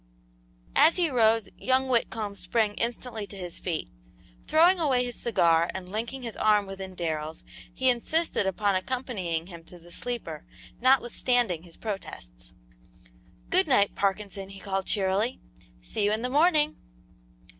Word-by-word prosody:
As 315 +3 +6
he 345 -4 +1
rose 225 -3 +3
young 260 +1 +1
Whitcomb 225 -4 0
sprang 215 +1 0
instantly 230 -2 -3
to 200 - -10
his 180 -2 -5
feet; 170 -4 -3 0.6
throwing 345 +4 +5
away 265 -6 +2
his 245 -1 -5
cigar 170 -7 +2
and 185 -1 -6
linking 235 +5 -4
his 230 -2 -5
arm 210 -1 +3
within 190 -1 -7
Darrell's, 160 -2 -3 0.3
he 260 +9 -1
insisted 255 - +1
upon 200 +1 +1
accompanying 185 -6 -2
him 170 -2 -11
to 180 - -13
the 175 0 -16
sleeper, 190 -9 -5 0.4
notwithstanding 245 -6 +2
his 170 -1 -11
protests. 125 - -7 1.0
"Good 370 0 +4
night, 205 -8 +3
Parkinson," 195 0 -2
he 195 0 -10
called, 195 -1 -3
cheerily; 200 +4 +1 0.4
"see 130 - -2
you 205 - +2
in 220 +2 -1
the 250 - -2
morning!" 305 0 +3
210 Hz, 145 wpm, -27 LUFS, 185-250 Hz, 1.0 s, As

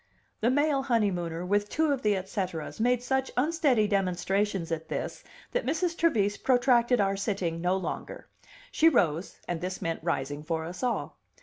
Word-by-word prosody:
The 230 - +2
male 290 +1 +2
honeymooner, 180 -8 0
with 205 +2 +1
two 315 -1 +1
of 270 - -3
the 210 -1 +2
et 190 0 -4
ceteras, 185 -5 -4
made 245 +1 +2
such 265 +1 0
unsteady 275 -6 +3
demonstrations 195 -1 0
at 160 0 -3
this - - -4 0.3
that - - 0
Mrs. 330 +4 0
Trevise 215 -13 +2
protracted 245 -1 +3
our 195 -1 +2
sitting 195 -5 -2
no 180 +2 +2
longer. 190 - -5 0.4
She 325 - +5
rose, 175 - +1
and 175 -1 -3
this 185 +1 -3
meant 165 0 -2
rising 145 -3 -2
for 160 +1 -2
us 175 +2 -7
all. 250 -2 -2
205 Hz, 170 wpm, -28 LUFS, 175-250 Hz, 0.4 s, She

